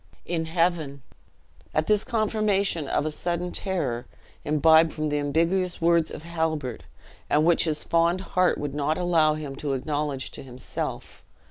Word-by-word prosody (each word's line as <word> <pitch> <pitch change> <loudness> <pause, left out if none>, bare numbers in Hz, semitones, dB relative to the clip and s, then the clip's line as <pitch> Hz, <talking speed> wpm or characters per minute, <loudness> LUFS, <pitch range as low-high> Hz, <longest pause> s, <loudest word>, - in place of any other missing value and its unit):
"In 165 -2 -2
heaven!" 160 -5 0 0.7
At 155 - +2
this 210 +2 +2
confirmation 210 - 0
of 145 - 0
a 155 - -1
sudden 175 +3 -2
terror, 145 -12 -2 0.4
imbibed 160 +2 +4
from 155 -1 -2
the 150 0 0
ambiguous 170 +5 0
words 170 -1 +3
of 150 - -8
Halbert, 160 -5 -2 0.5
and 150 +1 +3
which 170 0 +4
his 155 -2 -1
fond 170 +2 +2
heart 185 -1 +3
would 145 -2 -4
not 150 +2 0
allow 165 -4 +3
him 150 -3 -6
to 140 -1 -2
acknowledge 145 0 -2
to - - -7
himself. 130 -1 -6
160 Hz, 150 wpm, -25 LUFS, 145-175 Hz, 0.7 s, imbibed